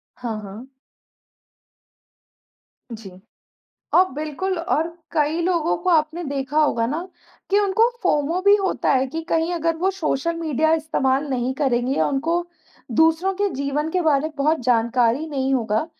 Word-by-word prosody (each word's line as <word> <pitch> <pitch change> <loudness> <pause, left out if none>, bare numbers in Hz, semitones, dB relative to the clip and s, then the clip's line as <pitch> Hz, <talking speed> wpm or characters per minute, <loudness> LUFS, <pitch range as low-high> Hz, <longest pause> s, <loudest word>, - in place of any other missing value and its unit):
हाँ, 230 -3 -5
हाँ। 210 +6 -10 2.2
जी। 220 -3 -8 0.9
अ, 360 - +8
बिल्कुल 310 +5 -3
और 330 -2 0 0.3
कई 310 +1 +1
लोगों 340 -2 +1
को 365 +1 -1
आपने 320 +1 +1
देखा 280 +1 -1
होगा 230 -6 +1
ना 300 +7 -3 0.5
कि 400 - +4
उनको 410 +3 +3
फोमो 330 -1 +1
भी 405 +1 +6
होता 390 -2 0
है 265 0 +2
कि 320 +5 -5
कहीं 330 +1 +1
अगर 330 0 0
वो 370 +4 +1
सोशल 335 -3 -2
मीडिया 315 -1 +1
इस्तेमाल 290 -3 0
नहीं 250 0 -1
करेंगे 260 -2 0
या - - +2
उनको 330 +5 0 0.6
दूसरों 325 +4 +3
के 405 +1 0
जीवन 280 +3 -2
के 365 - 0
बारे 310 -1 +2
में - - -16
बहुत 300 +1 +1
जानकारी 240 +3 +2
नहीं 270 -3 -1
होगा, 225 +3 0
310 Hz, 150 wpm, -22 LUFS, 265-335 Hz, 2.2 s, अ